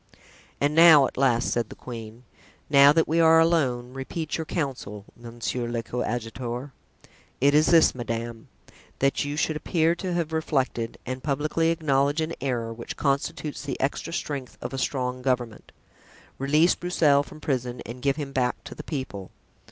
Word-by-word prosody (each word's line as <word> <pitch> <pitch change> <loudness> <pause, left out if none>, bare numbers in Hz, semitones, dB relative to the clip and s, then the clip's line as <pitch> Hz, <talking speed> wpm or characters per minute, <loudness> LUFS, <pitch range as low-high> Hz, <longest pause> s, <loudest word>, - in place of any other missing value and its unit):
"And 145 +1 +1
now," 160 -3 +8
at - - -5
last 125 -3 +2
said 120 -2 -1
the - - -10
queen, 115 -1 -9 0.5
"now 140 0 +8
that 160 +2 +2
we 165 +2 +1
are 165 0 +6
alone, 130 -7 +1
repeat 145 +4 -4
your 160 - -3
counsel, 130 - -4
monsieur 120 +1 -4
le 115 -1 -2
coadjuteur." 120 +2 -4 0.7
"It 140 +2 +4
is 155 +1 +4
this, 165 -2 +5
madame: 115 -1 -5 0.5
that 135 +2 +1
you 145 +1 -4
should 155 0 0
appear 165 +1 +1
to 180 +1 -4
have 165 -2 -2
reflected, 135 -7 -1
and 130 +1 -4
publicly 155 +4 0
acknowledge 145 -2 +1
an 160 +1 -2
error, 120 -4 -2
which 115 +1 -8
constitutes 145 +2 -1
the 135 -2 -5
extra 140 +4 -2
strength 140 -6 -4
of - - -6
a 135 - -3
strong 125 -1 -2
government; 125 -4 -2 0.7
release 150 +6 +4
Broussel 155 -5 +2
from 145 - -11
prison 125 -5 -2
and 120 +2 -8
give 140 0 +1
him 145 -3 -5
back 125 -2 -1
to - - -9
the - - -9
people." 120 - -5
135 Hz, 165 wpm, -25 LUFS, 120-155 Hz, 0.7 s, now